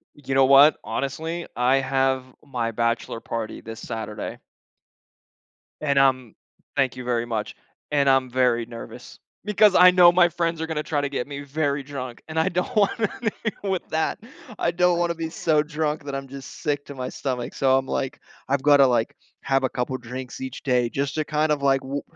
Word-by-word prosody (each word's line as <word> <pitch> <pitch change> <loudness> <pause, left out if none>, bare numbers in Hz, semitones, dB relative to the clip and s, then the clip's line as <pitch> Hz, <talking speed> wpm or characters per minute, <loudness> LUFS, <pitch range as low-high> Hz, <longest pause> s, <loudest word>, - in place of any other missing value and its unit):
You 135 -2 -5
know 135 0 +5
what? 140 +3 +7
Honestly, 160 +5 -3
I 125 +2 +3
have 135 -1 +1 0.2
my 120 -5 -2
bachelor 115 0 -1
party 115 -2 -5
this 115 0 -8
Saturday. 110 -2 -6 1.4
And 140 -2 +2
I'm 130 -4 +2 0.4
thank 135 -3 +1
you 125 - -7
very 120 -1 -1
much. 110 -2 -4 0.4
And 140 -2 +3
I'm 135 -1 +3
very 120 -2 +2
nervous 115 0 -10 0.3
because 210 -1 +4
I 180 0 +8
know 180 -1 +7
my 175 0 +5
friends 165 -1 -2
are 160 - -2
gonna 155 -2 -2
try 145 -2 -1
to 140 - -2
get 135 -3 -3
me 140 -1 -6
very 140 0 -1
drunk, 130 -3 -7
and 160 0 -6
I 160 - +2
don't 180 +7 -2
want 205 +2 +2
anything 220 -1 -2
with 190 -3 -2
that. 160 0 -1 0.4
I 170 - +1
don't 175 0 +2
wanna 170 -1 0
be 165 0 -4
so 155 -2 +1
drunk 150 0 -2
that 140 -1 -6
I'm 135 0 -5
just 135 -1 -10
sick 145 -1 -1
to 140 - -9
my 130 -1 -4
stomach. 125 -3 -4
So, 130 -1 +3
I'm 135 0 -2
like, 135 -1 -3 0.3
I've 140 0 +1
gotta, 145 -1 +6
like, 120 -3 +1 0.3
have 135 0 +1
a 130 - +1
couple 130 +1 -3
drinks 125 +2 -8
each 130 0 -6
day 125 -3 +2
just 140 +2 -2
to 155 - 0
kind 150 0 0
of, 145 -2 0
like, 135 -1 +3
wu 140 +2 -4
140 Hz, 195 wpm, -24 LUFS, 130-155 Hz, 1.4 s, I